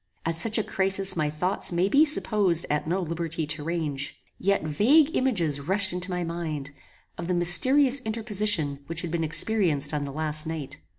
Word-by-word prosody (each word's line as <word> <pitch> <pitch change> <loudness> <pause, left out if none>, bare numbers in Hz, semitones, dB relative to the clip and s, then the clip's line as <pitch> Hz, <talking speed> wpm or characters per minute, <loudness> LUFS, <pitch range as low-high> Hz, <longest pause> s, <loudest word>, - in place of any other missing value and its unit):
At 165 - -1
such 215 +7 +5
a 220 - 0
crisis 195 0 0
my 155 -3 -1
thoughts 180 +7 -2
may 175 +2 +1
be 285 +9 +4
supposed 205 - 0
at 150 +1 -2
no 180 +4 -1
liberty 165 -1 -4
to 150 0 -5
range; 150 -4 -4 0.2
yet 200 -1 0
vague 260 - +3
images 175 - 0
rushed 190 +5 0
into 180 +1 -2
my 180 -1 -3
mind, 160 -4 -5 0.5
of 170 - -5
the 180 - -1
mysterious 255 +11 +5
interposition 210 -9 -1
which 165 +1 -2
had 170 -3 -6
been 170 -1 -2
experienced 160 -3 0
on 145 -1 -2
the 140 - -6
last 155 +1 -3
night. 150 -4 -6
170 Hz, 180 wpm, -25 LUFS, 155-200 Hz, 0.5 s, such